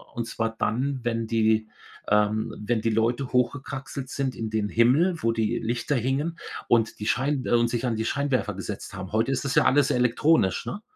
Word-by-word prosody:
Und 120 Hz, -2 st, -2 dB
zwar 115 Hz, 0 st, -3 dB
dann, 130 Hz, +3 st, -1 dB
wenn 115 Hz, -1 st, -1 dB
die, 110 Hz, -1 st, +2 dB, 0.4 s
ähm 105 Hz, +2 st, +2 dB
wenn 115 Hz, 0 st, 0 dB
die 115 Hz, -, +1 dB
Leute 115 Hz, +4 st, 0 dB
hochgekraxelt 130 Hz, +1 st, -2 dB
sind 135 Hz, -2 st, -2 dB
in 110 Hz, -1 st, -4 dB
den 110 Hz, -1 st, -1 dB
Himmel, 150 Hz, -, +3 dB
wo 115 Hz, 0 st, +1 dB
die 115 Hz, +1 st, 0 dB
Lichter 120 Hz, +5 st, -1 dB
hingen 135 Hz, +7 st, -1 dB, 0.3 s
und 115 Hz, -1 st, +2 dB
die 105 Hz, -, -4 dB
Schein 135 Hz, +2 st, 0 dB
äh, -, -, -2 dB
und 120 Hz, 0 st, +3 dB
sich 120 Hz, +1 st, -2 dB
an 120 Hz, -2 st, 0 dB
die 110 Hz, -, -2 dB
Scheinwerfer 135 Hz, -5 st, 0 dB
gesetzt 100 Hz, +1 st, -6 dB
haben. 95 Hz, -2 st, -7 dB
Heute 110 Hz, +5 st, +1 dB
ist 135 Hz, -, -2 dB
das 135 Hz, -, -1 dB
ja -, -, +5 dB
alles 140 Hz, 0 st, +4 dB
elektronisch, 125 Hz, -1 st, +2 dB
ne? 205 Hz, -, -5 dB
120 Hz, 195 wpm, -25 LUFS, 110-135 Hz, 0.4 s, ja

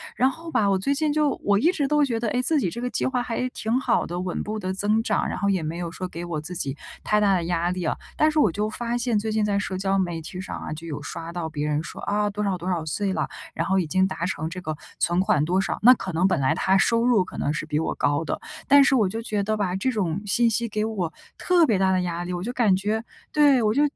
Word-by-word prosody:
然 260 Hz, -, +3 dB
后 330 Hz, +4 st, -10 dB
吧， 210 Hz, -10 st, +2 dB
我 195 Hz, -1 st, +2 dB
最 275 Hz, +9 st, +1 dB
近 305 Hz, +1 st, +1 dB
就 300 Hz, 0 st, +2 dB
我 200 Hz, 0 st, +3 dB
一 330 Hz, +9 st, +4 dB
直 290 Hz, -6 st, 0 dB
都 295 Hz, -1 st, +3 dB
觉 235 Hz, -4 st, -2 dB
得， 230 Hz, -, 0 dB
哎， 250 Hz, -, 0 dB
自 310 Hz, +5 st, +2 dB
己 185 Hz, -, 0 dB
这 235 Hz, -, -6 dB
个 250 Hz, +1 st, -2 dB
计 -, -, -1 dB
划 255 Hz, -1 st, 0 dB
还 245 Hz, +1 st, -2 dB
挺 230 Hz, -1 st, -1 dB
好 -, -, +1 dB
的， 175 Hz, +1 st, -4 dB
稳 180 Hz, -1 st, -3 dB
步 215 Hz, +1 st, -4 dB
地 185 Hz, -2 st, -3 dB
增 210 Hz, +3 st, +1 dB
长， -, -, 0 dB
然 -, -, -3 dB
后 200 Hz, -, +1 dB
也 190 Hz, -3 st, +1 dB
没 160 Hz, +2 st, -4 dB
有 170 Hz, -1 st, -4 dB
说 185 Hz, +1 st, -5 dB
给 170 Hz, -1 st, -7 dB
我 165 Hz, -3 st, -3 dB
自 175 Hz, +4 st, -6 dB
己 140 Hz, -4 st, -2 dB, 0.3 s
太 210 Hz, -, +2 dB
大 205 Hz, -2 st, +3 dB
的 175 Hz, -3 st, 0 dB
压 175 Hz, 0 st, 0 dB
力 180 Hz, 0 st, -3 dB
啊。 160 Hz, -, 0 dB, 0.2 s
但 310 Hz, -, +4 dB
是 310 Hz, -, +1 dB
我 215 Hz, -, +4 dB
就 210 Hz, +3 st, -2 dB
发 235 Hz, +2 st, -2 dB
现， 240 Hz, -2 st, 0 dB
最 215 Hz, +1 st, -1 dB
近 215 Hz, 0 st, +1 dB
在 205 Hz, -1 st, +1 dB
社 195 Hz, -2 st, -2 dB
交 195 Hz, +1 st, 0 dB
媒 175 Hz, -3 st, -1 dB
体 175 Hz, +3 st, -7 dB
上 185 Hz, -, -6 dB
啊， -, -, -6 dB
就 160 Hz, +2 st, -8 dB
有 145 Hz, -2 st, -5 dB
刷 165 Hz, +3 st, -6 dB
到 170 Hz, -2 st, -3 dB
别 150 Hz, -1 st, -3 dB
人 150 Hz, 0 st, 0 dB
说： -, -, -8 dB
“啊， 205 Hz, 0 st, 0 dB
多 205 Hz, +1 st, -3 dB
少 195 Hz, -2 st, 0 dB
多 180 Hz, +2 st, -5 dB
少 170 Hz, -3 st, -1 dB
岁 195 Hz, +5 st, -1 dB
了， -, -, -1 dB, 0.3 s
然 -, -, -2 dB
后 190 Hz, 0 st, +2 dB
已 175 Hz, -, -1 dB
经 185 Hz, +4 st, +2 dB
达 170 Hz, -3 st, -3 dB
成 160 Hz, -3 st, -3 dB
这 180 Hz, +2 st, -7 dB
个 155 Hz, -3 st, -4 dB, 0.2 s
存 175 Hz, +1 st, +1 dB
款 190 Hz, -7 st, +2 dB
多 180 Hz, +4 st, +1 dB
少“。 -, -, -2 dB
那 250 Hz, +3 st, +9 dB
可 190 Hz, -6 st, -5 dB
能 175 Hz, +4 st, +3 dB
本 185 Hz, -, +1 dB
来 135 Hz, +2 st, +2 dB
他 190 Hz, +2 st, +2 dB
收 230 Hz, +4 st, +3 dB
入 235 Hz, -6 st, +4 dB
可 -, -, -10 dB
能 145 Hz, -, 0 dB
是 155 Hz, -, -3 dB
比 150 Hz, -1 st, -1 dB
我 160 Hz, -, -2 dB
高 145 Hz, +2 st, +1 dB
的， -, -, -3 dB, 0.3 s
但 285 Hz, 0 st, +7 dB
是 270 Hz, -, +4 dB
我 215 Hz, -7 st, +3 dB
就 225 Hz, +4 st, -4 dB
觉 215 Hz, -3 st, -1 dB
得 215 Hz, +2 st, -1 dB
吧， 190 Hz, -3 st, -1 dB
这 230 Hz, +7 st, 0 dB
种 195 Hz, -5 st, -1 dB
信 230 Hz, +4 st, +4 dB
息 235 Hz, +1 st, +1 dB
给 215 Hz, +1 st, -1 dB
我 190 Hz, -7 st, -3 dB, 0.2 s
特 355 Hz, -2 st, +4 dB
别 215 Hz, -9 st, +1 dB
大 190 Hz, 0 st, +3 dB
的 185 Hz, -1 st, +2 dB
压 175 Hz, -1 st, -3 dB
力。 180 Hz, +1 st, -4 dB
我 175 Hz, 0 st, -3 dB
就 240 Hz, +4 st, -4 dB
感 220 Hz, -7 st, +3 dB
觉 210 Hz, +4 st, -1 dB, 0.3 s
对， 290 Hz, -4 st, +5 dB
我 215 Hz, 0 st, +2 dB
就 285 Hz, -, +2 dB
195 Hz, 320 characters per minute, -24 LUFS, 175-230 Hz, 0.3 s, 那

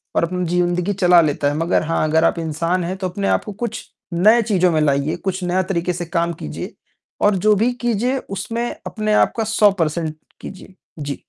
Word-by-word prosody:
और -, -, +2 dB
अपनी 180 Hz, +1 st, -1 dB
जिंदगी 175 Hz, +2 st, 0 dB
चला 180 Hz, -2 st, +5 dB
लेता 145 Hz, -2 st, 0 dB
है। 145 Hz, -, -3 dB
मगर 165 Hz, +2 st, +1 dB
हाँ, 165 Hz, 0 st, 0 dB
अगर 160 Hz, +1 st, +3 dB
आप 170 Hz, -, +1 dB
इंसान 165 Hz, +3 st, -1 dB
हैं 180 Hz, +3 st, -4 dB
तो 190 Hz, -1 st, -3 dB
अपने 195 Hz, +2 st, -3 dB
आप -, -, +1 dB
को 210 Hz, -, -5 dB
कुछ 230 Hz, -2 st, -4 dB, 0.3 s
नए 215 Hz, +7 st, +5 dB
चीज़ों 185 Hz, -5 st, +2 dB
में 155 Hz, -, +1 dB
लाइए, 145 Hz, +2 st, +1 dB
कुछ 185 Hz, +1 st, -4 dB
नए 180 Hz, +1 st, +1 dB
तरीके 180 Hz, -1 st, -1 dB
से 175 Hz, 0 st, -4 dB
काम 170 Hz, 0 st, -1 dB
कीजिए 75 Hz, -, -7 dB, 0.5 s
और 205 Hz, -1 st, +4 dB
जो 215 Hz, -1 st, +6 dB
भी 230 Hz, +5 st, +2 dB
कीजिए 240 Hz, +2 st, 0 dB
उसमें 225 Hz, +5 st, -3 dB, 0.2 s
अपने 215 Hz, -1 st, -2 dB
आप -, -, +3 dB
का 225 Hz, -, +1 dB
100 215 Hz, -1 st, +4 dB
पर्सेन्ट 160 Hz, -3 st, -2 dB, 0.2 s
कीजिए। 190 Hz, 0 st, -10 dB, 0.2 s
जी। 145 Hz, -1 st, -5 dB
180 Hz, 205 wpm, -20 LUFS, 165-205 Hz, 0.5 s, जो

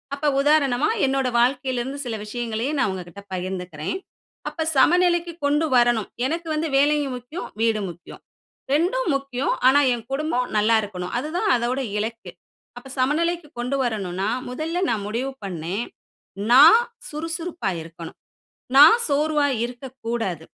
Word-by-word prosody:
அப்ப 285 Hz, +1 st, -6 dB, 0.2 s
உதாரணமா 290 Hz, -, +3 dB, 0.2 s
என்னோட 270 Hz, -1 st, 0 dB
வாழ்க்கையில 255 Hz, +1 st, +1 dB
இருந்து 270 Hz, +3 st, -5 dB
சில 235 Hz, -2 st, -3 dB
விஷயங்களையே 235 Hz, +3 st, -3 dB
நான் 240 Hz, -, +2 dB
உங்ககிட்ட 185 Hz, +1 st, -8 dB
பகிர்ந்துக்கிறேன். 180 Hz, -, -4 dB, 0.5 s
அப்ப 320 Hz, -, -3 dB
சமநிலைக்கு 345 Hz, +2 st, +3 dB
கொண்டு 295 Hz, +3 st, +2 dB
வரணும். 240 Hz, -3 st, +3 dB, 0.2 s
எனக்கு 330 Hz, +5 st, -2 dB
வந்து 315 Hz, +1 st, -1 dB
வேலையும் 290 Hz, -2 st, +2 dB
முக்கியம், 250 Hz, +8 st, -8 dB
வீடும் 220 Hz, -3 st, +1 dB
முக்கியம். 170 Hz, +1 st, -14 dB, 0.5 s
ரெண்டும் 360 Hz, +9 st, +1 dB
முக்கியம். 275 Hz, -1 st, -1 dB
ஆனா 270 Hz, +2 st, +6 dB
என் 235 Hz, -2 st, -6 dB
குடும்பம் 275 Hz, -4 st, -1 dB
நல்லா 215 Hz, +2 st, +4 dB
இருக்கனும். 180 Hz, -3 st, -6 dB
அதுதான் 345 Hz, -, -2 dB
அதோட 245 Hz, +2 st, -1 dB, 0.2 s
இலக்கு. 225 Hz, +2 st, -5 dB, 0.5 s
அப்ப 245 Hz, +2 st, -10 dB
சமநிலைக்கு 330 Hz, +5 st, 0 dB
கொண்டு 250 Hz, +3 st, -1 dB
வரணும்னா 195 Hz, -4 st, -2 dB, 0.2 s
முதல்ல 315 Hz, +7 st, -3 dB
நான் 210 Hz, -3 st, -1 dB
முடிவு 240 Hz, +6 st, -2 dB
பண்ணேன், 185 Hz, +4 st, -4 dB, 0.7 s
நான் 295 Hz, -, +9 dB, 0.3 s
சுறுசுறுப்பா 325 Hz, -, -4 dB
இருக்கனும், 165 Hz, 0 st, -10 dB, 0.6 s
நான் 310 Hz, +10 st, +9 dB
சோர்வா 295 Hz, 0 st, +2 dB, 0.2 s
இருக்கக்கூடாது. 235 Hz, -, -5 dB
255 Hz, 130 wpm, -23 LUFS, 220-300 Hz, 0.7 s, நான்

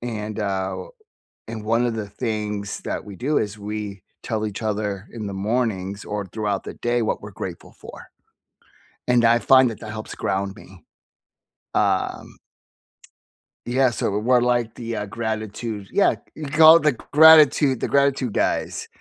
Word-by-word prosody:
and, 110 Hz, -3 st, -5 dB
uh, 95 Hz, -, -2 dB, 0.6 s
and 110 Hz, -1 st, -6 dB
1 115 Hz, +2 st, +2 dB
of 115 Hz, -2 st, -1 dB
the 105 Hz, -2 st, -5 dB
things 105 Hz, -3 st, -4 dB
that -, -, -4 dB
we 100 Hz, -, -9 dB
do 140 Hz, +8 st, 0 dB
is 105 Hz, -1 st, -3 dB
we 105 Hz, -2 st, -6 dB, 0.2 s
tell 110 Hz, -1 st, -2 dB
each 105 Hz, +1 st, -7 dB
other 105 Hz, -2 st, -3 dB
in 110 Hz, -3 st, -5 dB
the 100 Hz, -, -5 dB
mornings 100 Hz, -2 st, -2 dB
or 105 Hz, -1 st, -4 dB
throughout 100 Hz, 0 st, -3 dB
the -, -, -7 dB
day 120 Hz, 0 st, 0 dB
what -, -, -2 dB
we're -, -, -9 dB
grateful -, -, -8 dB
for. -, -, -12 dB, 1.0 s
And 125 Hz, -1 st, +3 dB
I 115 Hz, +1 st, +5 dB
find 130 Hz, 0 st, +5 dB
that 110 Hz, -, -9 dB
that 110 Hz, -, -7 dB
helps 110 Hz, 0 st, -7 dB
ground 95 Hz, 0 st, -2 dB
me. 95 Hz, -3 st, -15 dB, 0.9 s
Um -, -, -1 dB, 1.3 s
Yeah, 130 Hz, +2 st, +2 dB
so 105 Hz, -3 st, -2 dB
we're 125 Hz, +3 st, +3 dB
like 120 Hz, -2 st, 0 dB
the, 115 Hz, -1 st, -5 dB
uh, 105 Hz, -, -3 dB
gratitude 110 Hz, -1 st, -5 dB
yeah. -, -, +3 dB, 0.2 s
We 155 Hz, -, -6 dB
call 155 Hz, +3 st, +7 dB
it 170 Hz, -, -3 dB
the 150 Hz, -2 st, +3 dB
gratitude 150 Hz, -1 st, +6 dB
the -, -, -1 dB
gratitude 140 Hz, -4 st, +1 dB
guys. -, -, -1 dB
110 Hz, 160 wpm, -22 LUFS, 105-125 Hz, 1.3 s, call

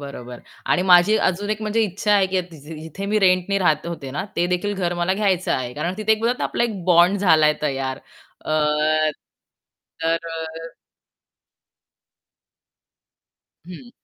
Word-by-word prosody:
बरोबर. 125 Hz, -4 st, -9 dB, 0.3 s
आणि 180 Hz, -, +2 dB
माझी 185 Hz, +3 st, +5 dB
अजून 200 Hz, +2 st, -1 dB
1 215 Hz, 0 st, -2 dB
म्हणजे 215 Hz, +1 st, 0 dB
इच्छा 210 Hz, +1 st, -1 dB
आहे, 195 Hz, -2 st, +3 dB
की 185 Hz, 0 st, 0 dB
तीजी 160 Hz, 0 st, -11 dB
जिथे 165 Hz, +5 st, -7 dB
मी 215 Hz, +1 st, +1 dB
रेंटनी 185 Hz, 0 st, +2 dB
राहत 155 Hz, -4 st, +1 dB
होते 160 Hz, -6 st, -6 dB
ना, 145 Hz, -, -4 dB
ते 175 Hz, -, +1 dB
देखील 180 Hz, +3 st, -1 dB
घर 175 Hz, -3 st, -2 dB
मला 175 Hz, +2 st, 0 dB
घ्यायचं 190 Hz, -3 st, 0 dB
आहे. 125 Hz, -1 st, -3 dB
कारण 170 Hz, +5 st, -3 dB
तिथे 215 Hz, +1 st, +2 dB
बोलत 240 Hz, +2 st, 0 dB
ना, -, -, -2 dB
आपला -, -, 0 dB
एक 210 Hz, -6 st, -4 dB
बॉन्ड 180 Hz, +2 st, +4 dB
झालाय 155 Hz, -5 st, +4 dB
तयार. 135 Hz, -3 st, -2 dB, 0.4 s
अ, -, -, -7 dB, 1.5 s
तर 165 Hz, +1 st, 0 dB
अ 165 Hz, 0 st, -7 dB, 3.0 s
हं. 180 Hz, +8 st, -11 dB
180 Hz, 150 wpm, -21 LUFS, 160-200 Hz, 3.0 s, माझी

